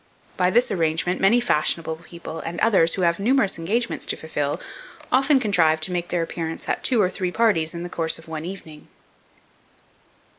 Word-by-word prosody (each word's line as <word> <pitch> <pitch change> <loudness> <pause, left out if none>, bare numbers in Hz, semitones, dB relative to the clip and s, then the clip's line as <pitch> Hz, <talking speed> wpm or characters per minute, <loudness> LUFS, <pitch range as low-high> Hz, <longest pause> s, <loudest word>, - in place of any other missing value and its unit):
By 180 -1 +2
this 240 +6 +2
arrangement, 165 +1 0
many 215 +5 +5
fashionable 160 -6 0
people 170 -1 -9
and 170 +1 -5
others, 190 -7 +4
who 185 - -1
have 170 +1 +2
numerous 215 -4 +1
engagements 230 +9 -2
to - - -1
fulfil, 145 -2 -3 0.5
often 270 +2 +4
contrive 170 -9 +3
to 155 - -3
make 175 -1 -3
their 175 -1 0
appearance 165 -1 -5
at - - -2
two 250 -3 +3
or 195 - +4
three 185 0 -3
parties 180 -7 +1
in 170 - -5
the - - -4
course 165 -2 0
of 165 - -15
one 160 -1 -5
evening. 165 -4 -9
175 Hz, 180 wpm, -23 LUFS, 160-205 Hz, 0.5 s, many